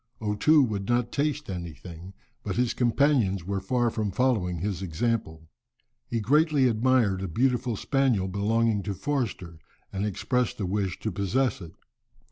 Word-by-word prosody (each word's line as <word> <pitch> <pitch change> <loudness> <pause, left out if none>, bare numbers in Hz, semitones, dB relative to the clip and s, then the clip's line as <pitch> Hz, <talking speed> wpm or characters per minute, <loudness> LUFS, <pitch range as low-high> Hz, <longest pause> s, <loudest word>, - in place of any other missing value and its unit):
O 105 -2 -1
Too 150 +8 +5
would 105 -4 -3
not 120 0 +1
taste 150 0 -1
anything, 85 0 -8 0.3
but - - -3
his 125 0 +1
companions 120 - +2
were 100 +1 -2
far 120 +3 +1
from 110 -2 -2
following 100 -5 0
his 95 +1 -3
example. 80 -3 -2 0.6
He 115 - -1
greatly 145 +4 +3
admired 115 -4 +2
a 95 - -3
beautiful 125 +5 0
spaniel 125 -5 +1
belonging 105 +2 +1
to 100 0 -4
Forster 105 - -3 0.3
and 95 +1 -2
expressed 120 +4 -1
a 100 - -1
wish 95 0 -1
to 110 - -2
possess 100 +5 0
it. 85 -2 -10
110 Hz, 150 wpm, -27 LUFS, 95-125 Hz, 0.6 s, Too